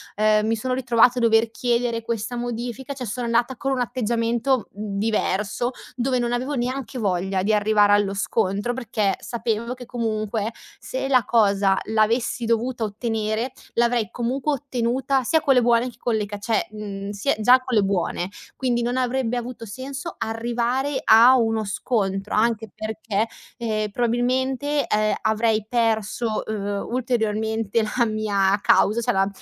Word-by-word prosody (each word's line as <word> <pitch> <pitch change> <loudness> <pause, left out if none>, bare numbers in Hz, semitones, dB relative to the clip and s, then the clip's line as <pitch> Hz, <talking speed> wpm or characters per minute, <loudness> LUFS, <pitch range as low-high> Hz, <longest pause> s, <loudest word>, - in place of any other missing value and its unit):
ehm, 215 0 +3
mi 225 - +2
sono 255 +3 -2
ritrovata 245 -1 +3
a - - -2
dover 225 -1 +3
chiedere 235 0 0
questa 235 +1 -3
modifica, 245 +3 -4
cioè 260 -2 -6
sono 240 +3 -3
andata 235 +2 +1
con 270 +2 -1
un 255 - -1
atteggiamento 235 +1 0
diverso, 210 +2 -1 0.3
dove 255 +1 +1
non 240 0 -1
avevo 255 +4 -1
neanche 255 0 -3
voglia 190 -1 0
di 215 +2 +2
arrivare 210 0 +4
allo 205 -1 +3
scontro, 200 +2 0
perché 220 -5 -1
sapevo 235 0 -2
che 250 -1 -10
comunque 220 -2 -2 0.3
se 265 +1 -4
la 255 -5 +4
cosa 200 -4 +3
l'avessi 225 +2 +1
dovuta 230 +1 0
ottenere, 220 +2 -2 0.2
l'avrei 235 -2 +2
comunque 255 +5 -1
ottenuta, 265 0 -1
sia 320 +6 +2
con 285 -2 +4
le 250 - +5
buone 235 +1 +3
che 240 - -16
con 240 -2 0
le 215 -1 0
ca 205 0 -6
cioè, 210 +1 -1
mhmm, 200 -2 -6
sia 205 +7 0
già 245 +4 +6
con 255 0 -8
le 210 - +5
buone. 190 -2 -1 0.3
Quindi 245 -2 0
non 245 +2 -1
avrebbe 250 -1 0
avuto 240 -1 -6
senso 270 - -6
arrivare 240 +4 -1
a 235 +4 +7
uno 225 -2 +1
scontro 195 -1 -1
anche 225 0 +1
perché, 220 0 -2 0.3
ehm, 215 -3 -1
probabilmente, 255 +5 0
ehm, 215 -1 +1
avrei 220 0 +1
perso, 225 -1 0
uhm, 205 -2 -3
ulteriormente 220 -3 0 0.2
la 240 - +4
mia 205 -2 +1
causa, 215 +4 +3
cioè - - 0
la 195 0 +3
230 Hz, 155 wpm, -23 LUFS, 215-245 Hz, 0.3 s, a